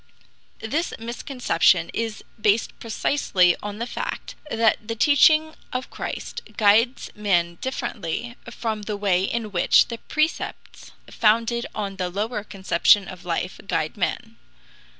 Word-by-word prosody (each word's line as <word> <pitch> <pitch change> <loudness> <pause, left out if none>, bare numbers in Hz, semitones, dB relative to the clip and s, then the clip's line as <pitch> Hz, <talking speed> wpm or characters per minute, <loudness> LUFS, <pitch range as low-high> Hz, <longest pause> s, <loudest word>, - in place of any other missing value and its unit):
The 290 +10 -2
misconception 230 - +1
is 225 -2 -3 0.2
based 210 +2 +1
precisely 210 -6 +2
on 205 0 -5
the 235 - -3
fact - - -5 0.2
that 225 -3 +1
the 225 - -2
teaching 310 +5 +5 0.2
of 255 0 -4
Christ - - -5 0.2
guides 225 +4 +3
men 175 -5 0
differently 235 -3 -4
from 220 -2 -3
the 210 0 -4
way 195 -3 +2
in 220 +1 -2
which 175 -3 +4
the 230 -1 -5
precepts 310 +1 -3 0.2
founded 230 +2 +2
on 200 -2 -4
the 180 -1 -2
lower 210 +4 -3
conception 195 -1 +3
of 180 -2 -10
life 180 +1 -3
guide 155 -5 -1
men. 225 +3 -3
215 Hz, 130 wpm, -24 LUFS, 195-235 Hz, 0.2 s, teaching